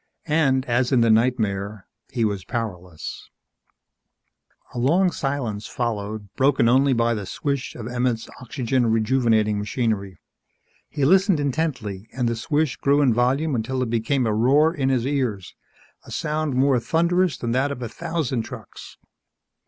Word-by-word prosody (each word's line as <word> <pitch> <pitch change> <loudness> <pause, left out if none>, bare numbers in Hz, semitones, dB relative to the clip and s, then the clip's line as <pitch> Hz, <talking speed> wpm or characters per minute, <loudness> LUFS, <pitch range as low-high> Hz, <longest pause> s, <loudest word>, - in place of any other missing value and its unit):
And, 140 -4 +2
as 125 +1 +1
in 125 -3 +4
the 115 -1 +4
nightmare, 110 -4 0 0.3
he 115 -2 0
was 100 -3 -2
powerless... 90 -7 -6 1.4
A 125 - -4
long 175 +9 +3
silence 125 -9 -3
followed 110 -4 -3
broken 135 -2 +3
only 135 +3 +4
by 115 -1 +2
the 105 -4 -4
swish 140 +1 -3
of 115 -2 -6
Emmett's 120 -2 -1
oxygen 125 0 -1
rejuvenating 110 -2 +2
machinery. 105 -3 -2 0.7
He 145 -3 -1
listened 190 +1 +4
intently 125 -9 -2
and 125 -1 -1
the 115 - 0
swish 145 +4 0
grew 140 +1 +2
in 130 -4 +4
volume 135 +6 +1
until 130 +2 -1
it 115 - -4
became 120 +3 +1
a 110 - +1
roar 140 +9 +4
in 135 -5 0
his 125 -3 +1
ears 125 -9 -2 0.5
a - - -15
sound 150 -2 -2
more 130 0 +3
thunderous 170 +4 +1
than 120 - -3
that 135 +4 +1
of 125 -3 -5
a - - -3
thousand 160 -4 -2
trucks. 110 - -10
125 Hz, 150 wpm, -23 LUFS, 110-140 Hz, 1.4 s, in